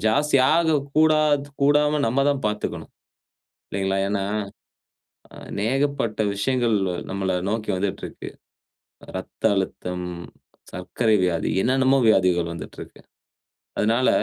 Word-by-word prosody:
ஜாஸ்தியாக 150 +6 +3 0.2
கூடாத் 155 -2 +3
கூடாம 150 +1 +3
நம்ம 130 +4 +1
தான் 135 -2 -2
பார்த்துக்கணும், 105 0 -4 0.8
இல்லேங்களா? 95 0 -1
ஏன்னா, 100 -1 -1 1.3
அநேகப்பட்ட 135 +1 -1
விஷயங்கள் 120 +2 +1 0.3
நம்மள 95 -1 -2 0.2
நோக்கி 110 0 -3
வந்துட்டு 100 +1 -3
இருக்கு. - - -8 0.8
இரத்த - - -8
அழுத்தம், 90 -1 -3 0.7
சர்க்கரை 110 +4 0
வியாதி, 85 -3 0
என்னென்னமோ 130 +1 +3
வியாதிகள் 90 -4 +3
வந்துட்டு 85 - -9
இருக்கு. - - -14 0.8
அதனால 115 +4 +2
115 Hz, 95 wpm, -23 LUFS, 95-140 Hz, 1.3 s, ஜாஸ்தியாக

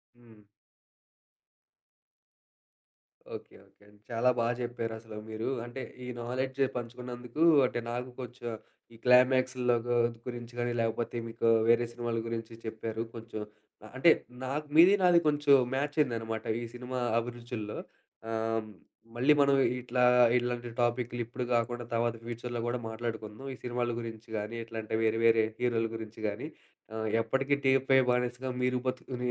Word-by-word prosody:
హ్మ్. 115 -3 -19 2.9
Okay. - - -10
Okay. 100 - -25 0.2
చాలా 120 +1 +2
బాగా 115 +1 +2
చెప్పారు 120 -2 -3
అసలు! 110 -1 -10
మీరూ 110 +1 -4 0.2
అంటే 120 +2 -6 0.2
ఈ - - -7 0.2
నాలెడ్జ్ 130 +2 -3 0.2
పంచుకున్నందుకు 125 +3 -4 0.2
అంటే 120 - -1
నాకు 125 +1 -3
కొంచెం 125 -1 -6 0.5
ఈ - - -14
క్లైమాక్స్‌లో 125 0 +4
గు 120 - +2 0.3
గురించి 120 -1 -6
కానీ, 120 0 0
లేకపోతే 115 +1 -1
మీకు 115 0 -1 0.2
వేరే 120 +1 +5
సినిమాల 120 -1 -2
గురించి 115 0 -4
చెప్పారు. 110 0 -4
కొంచెం 115 -1 -6 0.4
ఆహ్, 110 - -12
అంటే, 165 +5 +7 0.3
నాక్ 145 +4 -3
మీది 175 +5 +9
నాది 175 -2 +6
కొంచెం 145 -1 +5 0.2
మ్యాచ్ 145 +2 -1
అయిందన్నమాట. 115 -5 0 0.2
ఈ - - -4
సినిమా 125 +1 -4 0.2
అభిరుచుల్లో. 115 -2 -4 0.5
ఆహ్, 115 -1 -1 0.5
మళ్లీ 130 +5 +5
మనం 140 0 +5 0.2
ఇట్లా 125 0 -1 0.4
ఇలాంటి 120 0 -2
టాపిక్కులు 120 0 0
ఇప్పుడు 120 +2 -5
కాకుండా 120 +1 0
తర్వాత 115 0 +1
ఫ్యూచర్‌లో 120 +1 -5
కూడా 120 +1 -1
మాట్లాడుకుందాం. 110 +1 -5
ఈ - - -7
సినిమాల 120 0 -1
గురించి 115 0 -8
కానీ, 105 +2 -4
ఇట్లాంటి 110 -1 -4
వేరే 110 0 +2
వేరే 115 -1 +6 0.2
హీరోల 120 -2 +1
గురించి 110 0 -8
కానీ, 105 +8 -4 0.5
ఆహ్, 110 0 -2
ఎప్పటికీ 135 +5 +1
టీఎఫ్‌ఐ 135 0 +5
బానిసగా 125 +1 -1
మీరు 125 0 +2
బతుకు 130 0 -3
120 Hz, 135 wpm, -30 LUFS, 115-125 Hz, 2.9 s, మీది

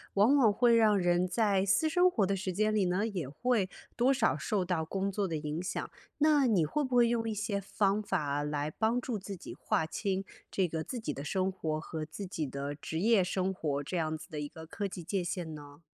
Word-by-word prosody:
往 215 +8 +5
往 245 -7 +5
会 235 +3 +4
让 215 -2 +5
人 175 0 +2
在 195 0 +2
私 200 +11 +3
生 360 +3 +4
活 215 - +2
的 195 +1 0
时 190 0 -3
间 215 +3 +1
里 210 - +3
呢， 185 +4 +1
也 180 -11 -4
会 210 - 0 0.3
多 250 +3 +4
少 270 - +2
受 205 -5 -1
到 175 -3 0
工 195 +4 -2
作 200 +1 -1
的 165 -4 -2
影 150 +3 -3
响。 180 - -3 0.3
那 295 -3 +4
你 190 -9 +3
会 295 - -1
不 255 -2 0
会 240 -1 +6
用 230 -1 0
一 - - -1
些 205 -1 -2
方 200 +1 +1
法 145 -7 -1
来 150 0 -2
帮 220 +8 +1
助 250 -2 -3
自 195 0 -7
己 - - -9
划 160 - 0
清 195 +3 -2 0.3
这 190 -2 +1
个 160 -1 -3
自 250 - -5
己 155 -10 -3
的 140 - -6
生 185 +5 0
活 160 -5 -2
和 160 0 -5
自 155 +6 -7
己 165 -4 -3
的 140 +1 -4
职 160 +2 -4
业 215 0 +4
生 185 +1 -1
活 145 -6 -2
这 165 - -5
样 160 -2 0
子 160 +3 -12
的 150 -3 -4
一 145 - -4
个 160 +2 -10
科 205 +4 -4
技 190 -2 -5
界 180 +3 -2
限 175 -3 -4
呢？ 145 +1 -12
190 Hz, 255 characters per minute, -31 LUFS, 160-215 Hz, 0.3 s, 会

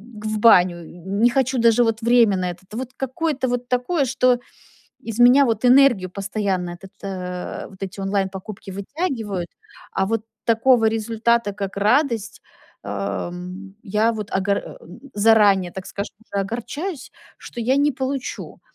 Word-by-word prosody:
г 215 +1 -6
в 215 0 -2
баню, 180 -6 +5 0.2
не 200 +5 +2
хочу 260 +1 0
даже, 230 +1 +5
вот, 225 0 0
время 230 -4 +4
на 180 -1 -1
это". 175 - -12
Вот, 255 +3 -5
какое-то 270 +1 -2
вот 245 0 -2
такое, 260 +5 +1
что 250 -1 +2 0.7
из 225 0 -4
меня, 250 +4 +7
вот, 225 -2 -1
энергию 250 -7 +5
постоянно, 195 -2 -2
этот, 185 +2 -12
э, 180 -2 -5
вот, 195 -1 -16
эти 195 0 -5
онлайн 195 0 0
покупки 195 +1 -9
вытягивают. 205 - -3 0.4
А 195 - +1
вот 225 +1 -1 0.2
такого 230 0 +4
результата, 225 0 +1
как 195 -1 -5
радость, 220 +1 +1 0.4
э, - - -7 0.4
м, 180 +2 -8
я 215 +2 +1
вот 210 -2 -6
огор 200 +1 +1
эм, 175 - -11
заранее, 205 -4 +4
так 190 0 -7
скажем, 200 +1 -6
уже 200 -3 -3
огорчаюсь, 275 - -5 0.3
что 240 - -8
я 250 +4 +2
не 290 +1 +3
получу. 265 0 -5
220 Hz, 155 wpm, -22 LUFS, 195-245 Hz, 0.7 s, меня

